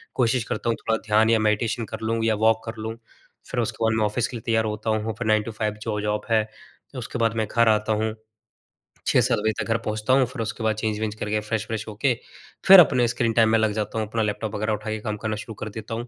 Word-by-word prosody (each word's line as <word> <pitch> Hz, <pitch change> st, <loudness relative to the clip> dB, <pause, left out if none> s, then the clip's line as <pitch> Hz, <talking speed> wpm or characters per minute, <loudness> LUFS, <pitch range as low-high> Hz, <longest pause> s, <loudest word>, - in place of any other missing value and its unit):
कोशिश 125 Hz, -1 st, +2 dB
करता 115 Hz, -, -1 dB
हूँ 115 Hz, -, +2 dB
थोड़ा 110 Hz, 0 st, 0 dB
ध्यान 110 Hz, +1 st, +4 dB
या 115 Hz, -, +4 dB
मेडिटेशन 110 Hz, +2 st, 0 dB
कर -, -, -6 dB
लूँ 115 Hz, 0 st, 0 dB
या 110 Hz, -1 st, +2 dB
वॉक 110 Hz, +1 st, +3 dB
कर 115 Hz, -, -4 dB
लूँ, 110 Hz, +1 st, -4 dB, 0.6 s
फिर 125 Hz, -, -1 dB
उसके 115 Hz, -, -3 dB
बाद 110 Hz, -, +2 dB
मैं 110 Hz, -, +2 dB
ऑफ़िस 115 Hz, +3 st, 0 dB
के 120 Hz, -, -6 dB
लिए -, -, -9 dB
तैयार 110 Hz, -1 st, +2 dB
होता 105 Hz, +1 st, -3 dB
हूँ, 110 Hz, 0 st, 0 dB
फिर 115 Hz, -, -2 dB
9 110 Hz, -1 st, +3 dB
टू 115 Hz, -, -6 dB
5 105 Hz, -1 st, -2 dB
जो 105 Hz, -2 st, -2 dB
जॉब 105 Hz, 0 st, -1 dB
है, 110 Hz, -1 st, +3 dB, 0.5 s
उसके 120 Hz, 0 st, -5 dB
बाद 115 Hz, -1 st, +1 dB
मैं 110 Hz, -2 st, 0 dB
घर 115 Hz, -1 st, +4 dB
आता 110 Hz, 0 st, +2 dB
हूँ 110 Hz, 0 st, -1 dB, 0.9 s
6-7 -, -, +3 dB
बजे 110 Hz, -, +2 dB
तक -, -, -2 dB
घर 115 Hz, -, +3 dB
पहुँचता 110 Hz, +3 st, 0 dB
हूँ 135 Hz, -1 st, +5 dB
फिर 125 Hz, -1 st, -6 dB
उसके 110 Hz, 0 st, -4 dB
बाद 110 Hz, -1 st, +1 dB
चेंज 110 Hz, 0 st, -2 dB
वेंज 110 Hz, -1 st, -2 dB
करके 105 Hz, 0 st, -2 dB
फ्रेश 105 Hz, 0 st, -3 dB
व्रेश 110 Hz, -1 st, -3 dB
होके 115 Hz, +5 st, 0 dB, 0.5 s
फिर 195 Hz, -1 st, +11 dB
अपने 125 Hz, -7 st, +5 dB
स्क्रीन 115 Hz, -1 st, 0 dB
टाइम 110 Hz, -1 st, +4 dB
में 115 Hz, -, +4 dB
लग 110 Hz, -1 st, +2 dB
जाता 110 Hz, +1 st, -2 dB
हूँ, 110 Hz, -, -2 dB
अपना 110 Hz, +1 st, -2 dB
लैपटॉप 105 Hz, 0 st, -2 dB
वग़ैरह 110 Hz, +1 st, -1 dB
उठा 110 Hz, +1 st, -4 dB
के 110 Hz, 0 st, -2 dB
काम 105 Hz, -1 st, -4 dB
करना 110 Hz, 0 st, -3 dB
शुरू 110 Hz, +1 st, -7 dB
कर 110 Hz, -, -4 dB
देता 110 Hz, +2 st, -7 dB
हूँ। 120 Hz, +2 st, -4 dB
110 Hz, 260 wpm, -24 LUFS, 110-115 Hz, 0.9 s, फिर